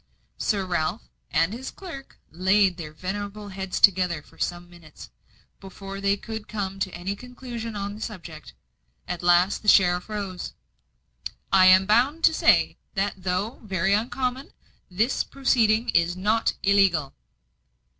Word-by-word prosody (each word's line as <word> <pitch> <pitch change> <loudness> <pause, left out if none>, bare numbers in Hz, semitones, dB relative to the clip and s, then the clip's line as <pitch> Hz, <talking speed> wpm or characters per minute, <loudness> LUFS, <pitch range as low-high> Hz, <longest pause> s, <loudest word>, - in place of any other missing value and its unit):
Sir 200 -3 0
Ralph 175 +3 -2 0.3
and 165 +5 +1
his 255 +3 -6
clerk 325 -8 -10
laid 190 +2 +2
their 155 -3 -7
venerable 205 +5 -6
heads 190 -1 -4
together 180 -5 +3
for - - -21
some 175 0 -3
minutes, 170 - -14 0.5
before 195 +1 -9
they 200 0 +2
could 220 0 -7
come 195 -2 -4
to 190 -1 -1
any 185 +3 -5
conclusion 240 -1 -8
on 200 0 -4
the 210 - -10
subject. 170 -8 -8 0.5
At 180 -1 -4
last 175 +2 +3
the 215 - -11
sheriff 180 -1 +4
rose. 200 -4 -5 1.0
"I 185 -1 +7
am 185 +1 +7
bound 255 +10 +2
to - - +6
say, - - +3 0.2
that, 195 +1 0
though 190 +6 -3
very 195 -1 0
uncommon, 250 +4 -2 0.4
this 215 +8 0
proceeding 235 -4 +1
is 170 -2 +2
not 215 +4 +1
illegal." 195 -8 +3
195 Hz, 140 wpm, -25 LUFS, 180-220 Hz, 1.0 s, I